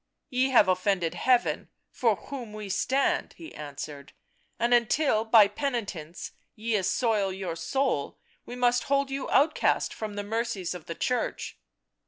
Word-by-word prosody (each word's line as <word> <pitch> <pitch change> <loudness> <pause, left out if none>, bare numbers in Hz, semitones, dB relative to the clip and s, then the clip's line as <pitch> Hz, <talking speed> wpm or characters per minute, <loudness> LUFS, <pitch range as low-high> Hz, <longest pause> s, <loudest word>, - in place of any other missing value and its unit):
" - - -57
Ye 255 +1 +2
have 235 -7 +6
offended 185 -2 +1
Heaven, 250 -2 +1 0.2
for 230 -4 +2
whom 240 -1 -8
we 210 -2 -7
stand," 265 +7 0
he 325 -1 -10
answered. 145 -1 -8 0.2
" - - -42
And 240 +1 +2
until 235 0 +3
by 220 -2 +7
penitence 205 - -4 0.2
ye 225 +1 -2
assoil 205 0 +1
your 185 -3 -4
soul 170 - -1 0.3
we 245 - -8
must 245 0 +2
hold 275 0 +1
you 270 0 -3
outcast 295 +3 +2
from 215 -2 -6
the 205 - -3
mercies 215 -4 -2
of 180 -3 -10
the 165 - -5
Church." 250 +6 -2
220 Hz, 155 wpm, -27 LUFS, 185-250 Hz, 0.3 s, by